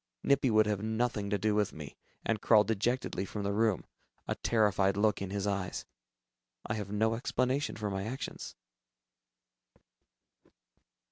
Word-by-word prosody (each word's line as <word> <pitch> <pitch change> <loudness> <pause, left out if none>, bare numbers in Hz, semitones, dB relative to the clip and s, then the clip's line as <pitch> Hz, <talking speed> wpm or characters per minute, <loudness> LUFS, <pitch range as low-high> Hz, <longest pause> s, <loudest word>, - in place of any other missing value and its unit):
Nippy 140 -2 +3
would 110 -1 +5
have 105 -2 -1
nothing 110 -1 -1
to 100 - +1
do 105 +2 +1
with 105 -1 +1
me, 75 -2 -9 0.3
and 110 -2 0
crawled 105 -2 +5
dejectedly 115 -1 -1
from 100 +1 -5
the 100 0 0
room, 110 -3 +1 0.4
a - - 0
terrified 100 -3 +2
look 105 -1 +2
in 100 - -3
his 100 0 -2
eyes. 100 -3 -2 0.8
I - - -2
have 105 -3 -4
no 110 +2 +2
explanation 130 +3 0
for 105 -1 -3
my 95 0 -2
actions. 130 +5 -6
105 Hz, 145 wpm, -31 LUFS, 100-115 Hz, 0.8 s, would